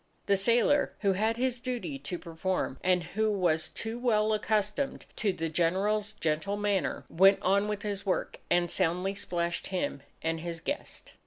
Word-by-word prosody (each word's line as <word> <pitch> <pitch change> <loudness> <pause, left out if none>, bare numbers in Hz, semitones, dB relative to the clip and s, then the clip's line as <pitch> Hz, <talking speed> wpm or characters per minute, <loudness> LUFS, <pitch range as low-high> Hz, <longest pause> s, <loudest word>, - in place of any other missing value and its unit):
The 200 - +4
sailor, 235 +8 +3
who 200 -2 +3
had 220 +4 +1
his 250 -1 0
duty 255 +3 -4
to 180 - -5
perform 170 -4 -2
and 180 -1 +3
who 215 +6 0
was 175 -6 +1
too 225 +1 -5
well 220 -3 +2
accustomed 215 +5 0
to 210 -3 +1
the 165 -3 -3
General's 195 +6 +1
gentle 165 +1 -1
manner, 205 -3 0
went 195 +3 +5
on 200 +2 +3
with 210 0 -3
his 200 -2 -3
work, 190 - -1
and 175 -1 +2
soundly 180 +2 +1
splashed 175 -3 -2
him 185 -6 -2 0.2
and 165 0 0
his 170 -1 -4
guest. 285 - -5
200 Hz, 165 wpm, -30 LUFS, 175-215 Hz, 0.2 s, went